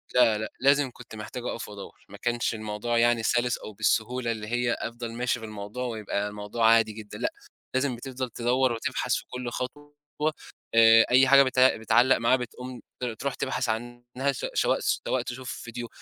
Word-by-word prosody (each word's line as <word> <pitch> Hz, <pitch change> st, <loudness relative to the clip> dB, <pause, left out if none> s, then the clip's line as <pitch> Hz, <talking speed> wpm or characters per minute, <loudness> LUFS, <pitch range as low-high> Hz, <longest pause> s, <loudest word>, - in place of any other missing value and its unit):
لا، 120 Hz, -4 st, +5 dB
لأ، 110 Hz, 0 st, -4 dB
لازم 140 Hz, 0 st, +3 dB
كُنت 120 Hz, -2 st, -12 dB
محتاج 110 Hz, +3 st, -7 dB
أقف 115 Hz, -, -4 dB
وأدوّر، 100 Hz, -1 st, -11 dB
ما 100 Hz, -, -10 dB
كانش 120 Hz, +2 st, -1 dB
الموضوع 110 Hz, +2 st, -2 dB
يعني 120 Hz, 0 st, +3 dB
سَلِس 120 Hz, +1 st, +1 dB
أو 110 Hz, -, -9 dB
بالسهولة 115 Hz, +3 st, 0 dB
اللي 110 Hz, -2 st, -5 dB
هي 120 Hz, +1 st, 0 dB
أفضل 115 Hz, 0 st, -5 dB
ماشي 125 Hz, +1 st, -1 dB
في 115 Hz, -, -7 dB
الموضوع 110 Hz, +3 st, -6 dB
ويبقى 105 Hz, -3 st, -2 dB
الموضوع 105 Hz, +2 st, -1 dB
عادي 115 Hz, -1 st, +5 dB
جدًا 105 Hz, -1 st, -9 dB
لأ، 320 Hz, -, -2 dB, 0.4 s
لازم 130 Hz, -1 st, +1 dB
بتفضل 130 Hz, +1 st, -5 dB
تدوّر 125 Hz, +3 st, +1 dB
وتبحث 115 Hz, -1 st, -1 dB
في -, -, -3 dB
كلّ 125 Hz, -1 st, -4 dB
خطوة، 145 Hz, +5 st, -6 dB, 0.8 s
آآ 115 Hz, 0 st, +8 dB
أي 130 Hz, +2 st, +6 dB
حاجة 140 Hz, +1 st, +8 dB
بتع 130 Hz, 0 st, +4 dB
بتعلّق 115 Hz, +4 st, +4 dB
معاه 115 Hz, +2 st, +3 dB
بتقوم 125 Hz, 0 st, -7 dB, 0.2 s
ت -, -, -4 dB
تروح 125 Hz, +4 st, -3 dB
تبحث 130 Hz, -2 st, -2 dB
عنها 120 Hz, +4 st, -2 dB
ش 135 Hz, -, -5 dB
سو -, -, +2 dB
سواء 130 Hz, -, 0 dB
تشوف 125 Hz, +2 st, -6 dB
فيديو، 120 Hz, +1 st, -6 dB
120 Hz, 180 wpm, -27 LUFS, 110-125 Hz, 0.8 s, آآ